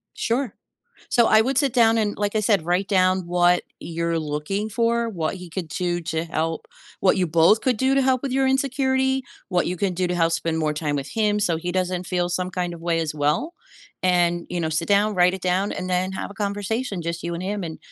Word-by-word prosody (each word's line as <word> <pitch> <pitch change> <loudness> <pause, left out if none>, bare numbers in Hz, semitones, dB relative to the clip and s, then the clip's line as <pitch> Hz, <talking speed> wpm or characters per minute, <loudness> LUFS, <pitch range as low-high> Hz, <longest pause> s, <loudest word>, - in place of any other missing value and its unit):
Sure. 240 -1 -1 0.6
So, 235 -2 +4
I 220 - +6
would 265 +3 0
sit 275 -5 +1
down, 230 -2 +4
and, 210 -1 -1
like 205 +1 -1
I - - +3
said, 200 -6 +2
write 180 +3 +1
down 185 -2 +2
what 175 0 +3 0.2
you're 170 0 -2
looking 155 +8 -3
for, 230 +1 +1
what 170 -3 -2
he 180 -1 -9
could 170 0 -5
do 175 +1 -2
to 160 0 -2
help, 160 0 -3 0.3
what 190 - +4
you 180 -2 +1
both 165 +7 +4
could 250 -4 +1
do 265 +3 +2
to 275 - +4
help 260 0 +1
with 270 - -2
your 265 0 +2
insecurity, 265 0 +1 0.3
what 180 -2 +1
you 180 0 -2
can 190 -1 0
do 180 0 0
to 180 - -1
help 165 -1 +2
spend 165 -1 -1
more 155 -1 0
time 150 -1 -2
with 140 0 -3
him 210 -2 +1
so 175 -5 +1
he 175 +2 -4
doesn't 185 -1 -1
feel 175 -1 0
some 180 +1 -2
kind 175 -1 -2
of 165 - -10
way 170 -1 0
as 155 -2 -2
well, 150 - 0 0.5
and 175 -2 +2
you 180 - -2
know, 160 -1 -1
sit 160 +1 -1
down, 205 +1 +3
write 180 +1 +4
it 190 - -10
down, 185 +2 0
and 185 - -4
then 185 +1 0
have 195 - -5
a - - -10
conversation, 205 0 -2
just 170 0 -3
you 170 0 -3
and 175 - -5
him 200 0 -3
and 160 -1 -6
185 Hz, 240 wpm, -23 LUFS, 170-215 Hz, 0.6 s, I